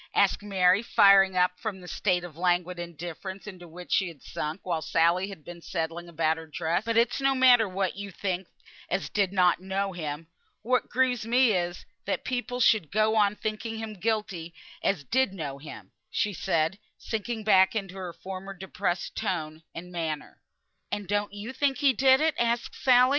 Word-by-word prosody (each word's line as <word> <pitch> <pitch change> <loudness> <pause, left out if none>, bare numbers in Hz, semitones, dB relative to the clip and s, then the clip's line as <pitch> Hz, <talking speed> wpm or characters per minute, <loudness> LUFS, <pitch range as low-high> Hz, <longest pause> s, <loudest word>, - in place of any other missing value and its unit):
asked - - +3
Mary, 190 -1 +3
firing 195 -4 +5
up 180 0 +4
from 205 -2 -4
the 180 - -12
state 180 -1 0
of 175 -4 -9
languid 180 0 0
indifference 175 +3 -7
into 185 -4 -9
which 175 +2 -11
she 190 - +3
had 160 -6 -11
sunk 155 +5 -4
while 170 -3 -1
Sally 170 +4 +2
had 175 -7 -11
been 175 -1 -9
settling 165 0 -4
about 160 -1 +1
her 165 0 -9
dress. 165 +4 -1
"But 230 0 0
it's 235 +3 +2
no 270 0 +3
matter 245 -5 +6
what 190 0 -1
you 200 0 -5
think 185 -1 -3 0.4
as - - -1
did 200 -3 +1
not 180 -3 +3
know 195 +1 -2
him. 155 -2 -5 0.4
What 255 +3 +1
grieves 250 -3 +1
me 245 0 +4
is, 175 -2 -2 0.2
that - - -2
people 250 -1 -2
should 215 -9 +4
go 215 +1 +2
on 210 -1 +3
thinking 220 +1 -4
him 220 -1 -5
guilty 195 -5 -2 0.3
as 180 -7 0
did 255 - +1
know 145 -7 -5
him," 110 -10 -10 0.2
she 210 - 0
said, 165 +2 0 0.2
sinking 220 0 -4
back 190 -1 +5
into 195 -4 -3
her 185 -2 -6
former 190 +2 -8
depressed 180 -1 -3
tone 160 -7 -3
and 180 +1 -8
manner. 160 -3 -4 0.5
"And 205 -2 -3
don't 205 +1 0
you 205 +5 -7
think 270 0 +1
he 275 0 +4
did 265 +3 +5
it?" 315 0 +3
asked 235 0 0
Sally. 255 -1 +5
190 Hz, 185 wpm, -27 LUFS, 175-220 Hz, 0.5 s, matter